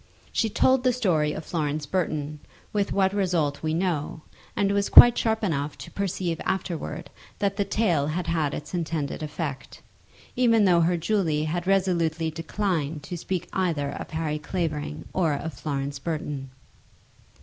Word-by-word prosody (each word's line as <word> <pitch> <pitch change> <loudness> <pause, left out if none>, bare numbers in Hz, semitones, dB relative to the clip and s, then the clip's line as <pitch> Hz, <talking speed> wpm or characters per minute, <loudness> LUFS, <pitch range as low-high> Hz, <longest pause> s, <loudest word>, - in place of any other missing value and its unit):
She 225 - +1
told 260 +4 +3
the 255 -1 +3
story 170 -11 +1
of 155 - -6
Florence 150 -2 -2
Burton, 150 -3 -2 0.3
with 205 -1 0
what 190 -1 +2
result 175 -8 0
we 155 0 -1
know; 165 -3 -1 0.3
and 200 -1 +2
was 200 0 +1
quite 240 0 +10
sharp 220 -1 0
enough 150 -6 -1
to - - -10
perceive 180 -4 -2
afterwards 180 -3 -3 0.3
that 200 -1 0
the 200 0 0
tale 180 -9 +1
had 170 +3 -2
had 160 -4 0
its 150 - -8
intended 160 -5 -2
effect, 150 -3 -5 0.6
even 230 -4 +4
though 175 -3 +5
her 175 +1 +2
Julie 165 -4 +1
had 175 +3 -2
resolutely 170 -4 +1
declined 165 -3 -2
to 175 - -5
speak 180 +1 -3
either 160 -7 0
of - - -7
Harry 155 -1 -2
Clavering 155 -3 -3
or 170 -5 +2
of 160 +2 -5
Florence 140 +1 -3
Burton. 150 -3 -4
165 Hz, 155 wpm, -26 LUFS, 150-190 Hz, 0.6 s, quite